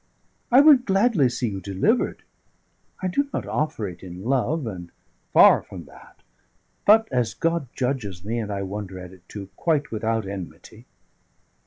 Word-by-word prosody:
I 255 +3 +8
would 285 -4 +6
gladly 195 - +3
see 120 -1 -2
you 95 -2 -6
delivered. 100 - 0 0.8
I - - +1
do 280 +10 0
not - - -3
offer 150 -9 -2
it 90 -2 -10
in 90 0 -9
love, 135 +5 0
and 90 -6 -7 0.4
far - - +7
from - - -10
that; - - -18 0.6
but, 220 +2 +6
as 120 -4 0
God 165 -4 -1
judges 110 -9 -3
me 115 +3 -2
and 110 -2 -4
I 100 -1 -3
wonder 95 -1 -6
at 90 0 -10
it 95 - -17
too! 100 -2 -8
quite 155 -4 0
without 110 -1 -1
enmity." 95 -3 -9
115 Hz, 160 wpm, -24 LUFS, -, 0.8 s, I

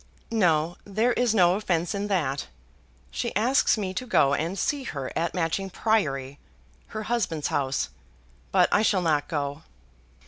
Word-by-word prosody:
"No, 175 -6 +2
there 220 +5 +1
is 240 -2 +1
no 175 -3 +5
offence 180 -4 -1
in 200 0 -2
that. 150 -9 -1 0.6
She - - -3
asks 235 +4 +3
me 190 -3 -3
to 255 +7 -4
go 140 - +4
and 165 +7 -1
see 285 +8 0
her 140 - -5
at 170 +3 -1
Matching 180 +3 -1
Priory, 140 - 0 0.5
her 215 - -5
husband's 210 -10 -1
house; 135 -1 -1 0.6
but - - +5
I - - +4
shall 195 -4 +2
not 150 -3 +1
go." 145 -1 -3
180 Hz, 150 wpm, -26 LUFS, 150-215 Hz, 0.6 s, no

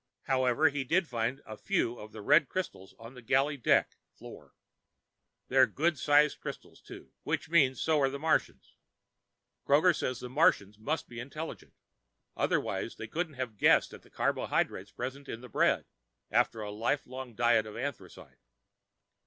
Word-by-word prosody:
However, 130 +3 +2
he 145 -1 -3
did 170 +6 +1
find 120 +3 -2
a 110 - -8
few 120 +2 -1
of 105 0 -10
the 110 -2 -9
red 150 +9 +4
crystals 100 - -5
on 115 +2 -11
the 125 - -12
galley 135 +5 +1
deck 125 - +1 0.2
(floor). - - -13 0.9
They're 130 0 +5
good 160 -1 0
sized 150 +1 +3
crystals, - - -9
too. - - -12
Which - - -3
means 135 -7 +4
so 160 -2 +2
are 135 - +3
the 140 - -5
Martians. 160 +3 -1 0.9
Kroger 155 +5 +4
says 125 -2 -3
the 125 - -6
Martians 120 - +2
must 150 +8 -2
be 120 -1 -9
intelligent, 150 +6 -8 0.6
otherwise - - -1
they - - -7
couldn't 160 +4 -3
have 125 -5 -5
guessed - - +4
at - - -11
the - - -22
carbohydrates 95 +2 -1
present 135 +3 -6
in 115 - -6
the 125 - -11
bread - - +2 0.5
after 115 - +1
a 105 -1 -5
lifelong 125 +2 -3
diet 120 -2 +3
of 105 - -9
anthracite. 120 -8 -7
130 Hz, 160 wpm, -30 LUFS, 115-150 Hz, 0.9 s, They're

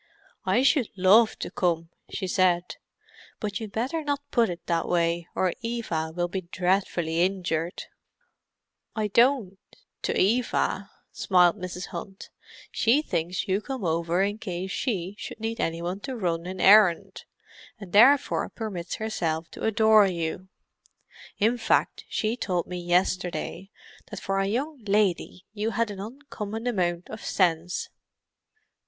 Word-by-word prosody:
"I 210 +7 +3
should 275 -4 +3
love 205 +5 +5
to - - -5
come," 165 -2 0 0.2
she 195 - -4
said. 180 -1 +1 0.6
"But 205 -2 -3
you'd 220 -3 -6
better 260 +10 -2
not 285 -1 -3
put 235 -4 +3
it 175 -1 -7
that 170 -1 0
way, 170 0 +1
or 185 -2 +1
Eva 225 -10 -2
will 175 0 0
be 190 +2 -3
dreadfully 180 -2 0
injured." 175 -2 -1 1.1
"I 215 -1 -1
don't—to 230 -4 0
Eva," 205 -2 +1 0.2
smiled 180 -1 +3
Mrs. 180 0 -6
Hunt. 190 +3 -8 0.4
"She 255 +7 +3
thinks 175 - -2
you 195 +2 +1
come 260 -4 -5
over 170 +2 +1
in 205 +2 -2
case 185 -1 -4
she 195 -7 -2
should - - -7
need 225 +1 -3
any 165 +1 -1
one 180 +3 -3
to 260 +4 -5
run 170 -4 -2
an 185 0 -6
errand, 195 -1 +5 0.5
and 195 -4 -10
therefore 270 +7 +5
permits 195 -6 -5
herself 165 -7 -2
to - - -6
adore 220 -1 +5
you. 175 +1 -3 0.9
In 230 +4 +2
fact, 225 - +1
she 220 +1 -1
told 180 -8 -1
me 180 0 -5
yesterday, 180 +1 -1 0.4
that 210 - -6
for 195 0 -1
a 195 - +1
young 275 +8 -2
lady 195 -3 0
you 215 +1 -1
had 230 0 -1
an 195 - -8
uncommon 225 -1 -6
amount 180 -7 -1
of 215 +1 -8
sense!" 175 -1 0
195 Hz, 140 wpm, -26 LUFS, 175-220 Hz, 1.1 s, love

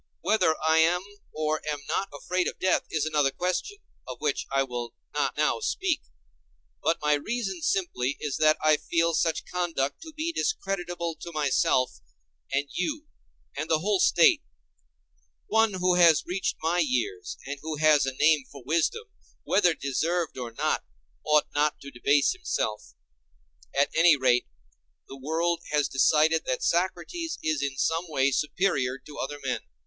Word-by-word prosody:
Whether 160 -7 +2
I 160 0 +5
am 175 +3 +3 0.3
or 155 0 -1
am 145 -1 -3
not 190 +5 -1
afraid 180 +5 -2
of - - -4
death 185 - +1
is 155 -2 -1
another 150 -3 +2
question, 180 - -2 0.3
of 125 -2 -7
which 150 -2 -1
I 135 0 +2
will 120 -2 -6 0.2
not - - -1
now - - +1
speak. - - -1 0.8
But 165 - +1
my 150 0 +3
reason 195 +3 -2
simply 145 -7 -1
is 145 -3 -3
that 155 0 +4
I 155 -1 +5
feel 165 +2 0
such 160 0 0
conduct 170 -6 -2
to 320 -1 -9
be 315 +2 -3
discreditable 175 - -2
to 170 - -7
myself, 135 - +1 0.5
and 140 +1 0
you, 300 - -3 0.5
and - - -4
the 160 - +4
whole 195 +4 0
State. 170 -2 +5 1.0
One 225 -1 +2
who 180 0 +2
has 170 -3 +5
reached 185 +2 -2
my 170 +2 +1
years, 400 - -1
and 140 +1 -5
who 155 0 -4
has 150 -2 +4
a 135 - -2
name 150 -1 +3
for 140 -3 -11
wisdom, 170 - 0 0.4
whether 180 -5 +3
deserved 160 +5 -1
or 125 -2 -5
not, 115 - -1 0.4
ought 150 -1 +3
not 150 +1 +1
to 140 - -9
debase 140 +3 +2
himself. 105 - -3 0.8
At 140 - +1
any 165 -1 +6
rate, 125 -2 +2 0.6
the 135 - -9
world 165 +4 -1
has 150 -2 +1
decided 155 +4 +3
that 130 - -1
Socrates 190 - -1
is 155 -2 0
in 140 -1 -2
some 165 +5 0
way 140 -2 +2
superior 140 -4 0
to 145 +2 -12
other 145 +2 -4
men. 130 -2 -1
155 Hz, 160 wpm, -27 LUFS, 140-180 Hz, 1.0 s, any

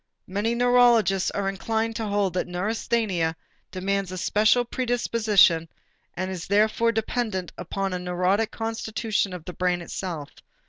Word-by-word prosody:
Many 205 +5 -1
neurologists 240 -5 +4
are 200 -1 -2
inclined 220 +3 -1
to 225 -2 -3
hold 200 -3 0
that 180 - -1
neurasthenia 185 -2 -1 0.3
demands 195 0 -2
a 185 - -5
special 215 +6 +3
predisposition 220 -9 +2 0.5
and 185 +1 -3
is 180 -3 -6
therefore 215 +3 +3
dependent 220 -4 -2
upon 195 +2 -3
a 180 - -2
neurotic 180 +4 0
constitution 225 -2 -2
of 180 -3 -8
the 180 - -6
brain 180 0 0
itself. 170 -4 -5
200 Hz, 135 wpm, -25 LUFS, 180-225 Hz, 0.5 s, neurologists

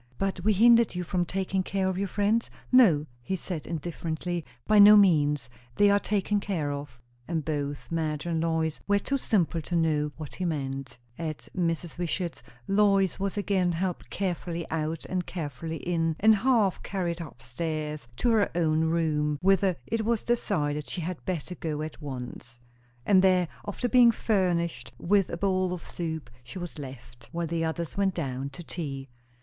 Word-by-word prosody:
"But 195 -2 -2
we 215 +2 +4
hindered 230 0 +5
you 180 - -2
from 175 +1 0
taking 190 +1 -1
care 190 0 -1
of 190 - 0
your 200 +2 -1
friends?" 205 +4 +1 0.2
"No," 195 - +6 0.2
he 190 +10 -2
said 175 -4 -5
indifferently; 170 +1 -3 0.2
"by 215 -1 +5
no 210 +1 +10
means. 150 - +4 0.3
They 205 0 +5
are 200 - +4
taken 205 0 0
care 170 -8 -2
of." 140 -3 -7 0.3
And 165 -3 -2
both 145 -2 -3
Madge 155 -2 -1
and 165 -2 0
Lois 160 -1 0
were 205 0 +4
too 275 +7 -1
simple 175 -8 +1
to 175 +3 -4
know 155 -3 +1
what 155 -3 -7
he 185 - -5
meant. 135 -5 -3 0.2
At 155 -3 -5
Mrs. 170 -1 -2
Wishart's, 175 0 -2 0.3
Lois 195 -2 +3
was 195 +1 -2
again 190 -3 +1
helped 180 +1 -3
carefully 175 -3 -3
out 160 0 -2
and 180 -1 -2
carefully 160 -1 -5
in, 165 -2 0
and 220 +2 +6
half 220 -4 +2
carried 175 -3 -3
up 160 - -9
stairs 150 +1 -4
to 240 - +2
her 215 -3 +3
own 160 -2 +2
room, 155 -2 +1
whither 195 -1 +4
it 225 +6 -1
was 230 0 0
decided 150 -11 0
she 180 - -3
had 170 0 -5
better 180 -1 -3
go 155 -3 -3
at 155 +1 -7
once. 125 -3 -7 0.5
And 190 -2 +5
there, 185 -2 +4 0.2
after 205 +4 -2
being 245 -1 +7
furnished 175 - 0
with 195 - +2
a 170 - -4
bowl 185 -1 +1
of 180 - -7
soup, 160 -5 -5
she 120 - -9
was 175 -3 -6
left, 120 -3 -10
while 170 0 -2
the 165 0 -1
others 165 0 -3
went 195 -2 +1
down 135 -4 -3
to 140 +5 -10
tea. 140 -5 -5
170 Hz, 175 wpm, -28 LUFS, 155-195 Hz, 0.5 s, no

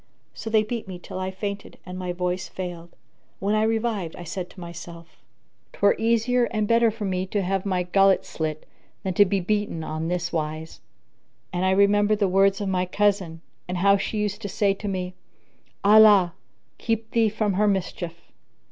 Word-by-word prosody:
So 225 - -6
they 220 -1 +4
beat 225 0 -5
me 185 -2 -6
till 180 - -8
I 185 0 -2
fainted 200 +1 -6
and 180 -1 -7
my 180 -1 -3
voice 180 +1 -2
failed. 175 -2 -7 0.4
When 200 +2 -1
I 215 - +3
revived, 220 -6 -1
I 175 - -8
said 175 +2 -5
to - - -15
myself, 170 -1 -10 0.3
" - - -44
'Twere 200 - +4
easier 235 +2 +2
and 215 -3 -1
better 230 +1 +4
for 215 -1 -5
me 185 -1 -1
to 200 +1 -1
have 195 +1 -1
my 185 -2 0
gullet 195 +2 +3
slit 155 -1 -4 0.4
than 190 -2 -1
to 205 +3 +6
be 195 0 0
beaten 205 -3 -1
on 155 +1 -3
this 175 0 -2
wise!" 155 0 -4 0.7
And 180 +1 0
I - - +3
remembered 205 +2 +4
the 200 -1 +2
words 195 +1 +3
of 200 - -2
my 185 -1 0
cousin, 190 -4 0 0.3
and 180 0 -3
how 200 +2 +5
she 200 +2 -2
used 210 -1 -2
to 205 - -4
say 200 +1 +2
to 205 +2 -7
me, 185 -2 -3 0.7
"Allah, 205 -4 +7 0.5
keep 225 -1 -2
thee 225 -2 +3
from 210 -1 -1
her 210 +3 +2
mischief!" 175 -3 -3
195 Hz, 190 wpm, -24 LUFS, 180-210 Hz, 0.7 s, Allah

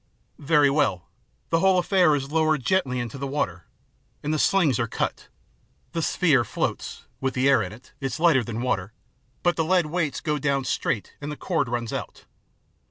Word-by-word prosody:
" - - -38 0.2
Very 145 -2 +6
well. 100 - 0 0.4
The 165 - +3
whole 190 +1 +4
affair 180 -3 +4
is 140 0 -4
lowered 155 -4 +1
gently 135 -10 +1
into 120 +2 -5
the 140 - -3
water, 95 - -2 0.6
and 150 +1 -1
the 155 - 0
slings 160 - +3
are 115 - 0
cut. - - -3 0.6
The - - -2
sphere - - +3
floats, - - -3
with 135 0 -2
the 130 +1 +2
air 140 - +5
in 90 - -4
it, 120 +4 -15
it's 135 +2 -3
lighter 160 -7 +4
than 115 +1 -4
water, 110 -5 -1 0.5
but 175 0 +2
the 165 - +2
lead 180 +1 +3
weights 155 -2 -1
go 150 -2 -1
down 140 -1 0
straight 110 -4 -2
and 145 +1 -4
the 150 - -6
cord 165 -9 -1
runs 120 -1 -3
out. - - -6
140 Hz, 190 wpm, -25 LUFS, 120-160 Hz, 0.6 s, Very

